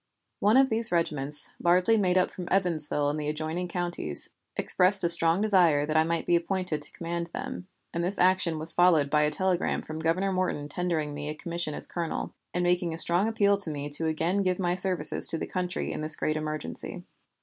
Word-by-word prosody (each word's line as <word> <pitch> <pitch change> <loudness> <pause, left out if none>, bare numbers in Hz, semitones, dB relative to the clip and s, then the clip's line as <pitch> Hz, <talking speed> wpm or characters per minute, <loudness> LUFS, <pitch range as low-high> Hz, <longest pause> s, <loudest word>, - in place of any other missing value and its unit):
One 210 +5 +3
of 265 0 +3
these 225 -1 +3
regiments, 150 -4 +1
largely 180 +6 +3
made 185 -4 +1
up 185 - +1
from 180 -2 -8
Evansville 155 -6 0
and 150 - -5
the 150 0 -3
adjoining 155 +4 -4
counties, 175 - -1 0.2
expressed 185 +2 +3
a 170 - +3
strong 170 +2 +5
desire 175 -9 +3
that 155 +1 -4
I 155 - +4
might 165 0 -3
be 175 - +2
appointed 170 -2 +1
to 145 - -5
command 170 0 -5
them, 180 - -7 0.3
and 170 - -2
this 185 +3 -3
action 180 -3 +2
was 160 +1 0
followed 160 -5 +3
by 150 - +3
a 150 - +2
telegram 185 +2 -1
from 155 0 -8
Governor 175 +5 -1
Morton 180 -6 -2
tendering 160 -3 -3
me 145 0 -6
a 150 - -5
commission 170 -1 -5
as - - -1
colonel, 170 -2 -5 0.2
and 180 - -2
making 175 -2 0
a - - -9
strong 175 +5 +1
appeal 200 -3 +1
to 195 -5 0
me 145 -1 -5
to 155 +3 -1
again 165 +5 -1
give 185 -2 -1
my 175 -2 -1
services 185 -1 +4
to 165 - -2
the - - -4
country 180 -1 -4
in - - -5
this 155 0 +2
great 155 - -2
emergency. 155 - -6
170 Hz, 210 wpm, -26 LUFS, 155-185 Hz, 0.3 s, strong